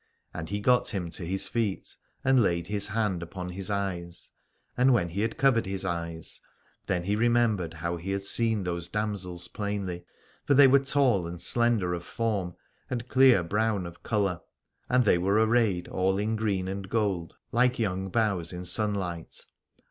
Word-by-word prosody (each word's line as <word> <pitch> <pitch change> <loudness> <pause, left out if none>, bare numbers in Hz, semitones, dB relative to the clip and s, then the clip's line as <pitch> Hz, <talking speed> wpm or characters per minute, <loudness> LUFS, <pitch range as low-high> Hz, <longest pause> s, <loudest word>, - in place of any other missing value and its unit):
And 80 - -6
he 100 +1 -2
got 125 +4 +3
him 90 -5 -3
to 90 - -5
his 95 +2 0
feet 110 -5 -2 0.3
and 130 -1 +4
laid 85 -5 +1
his 100 +1 -1
hand 105 -4 -1
upon 90 +1 -6
his 95 +2 -3
eyes: 90 -4 -3 0.4
and 130 +1 +4
when 85 -7 +1
he 95 +5 -3
had 110 +1 -1
covered 130 -7 +3
his 95 0 -3
eyes 85 -2 -4 0.5
then 90 -2 0
he 100 +3 0
remembered 110 -7 +2
how 85 +2 -3
he 85 +3 -7
had 100 0 -1
seen 110 0 +1
those 85 -1 -2
damsels 95 -4 -3
plainly. 100 -3 -4 0.4
For 140 - +3
they 140 +1 +8
were 135 +1 +6
tall 135 -9 +2
and 85 0 -7
slender 115 -5 +1
of 85 0 -4
form 100 -5 -2 0.3
and 120 -1 -3
clear 130 -7 +5
brown 105 +1 0
of 85 0 -10
colour: 100 -5 0 0.5
and 125 -1 +3
they 90 - +4
were 95 +3 +1
arrayed 110 -5 +2
all 95 +1 0
in 105 +2 0
green 100 -4 -1
and 95 0 -5
gold 100 -7 -1 0.2
like 125 +2 +3
young 95 -4 -1
boughs 100 -6 0
in 90 0 -6
sunlight. 95 -5 -2
100 Hz, 175 wpm, -28 LUFS, 90-115 Hz, 0.5 s, they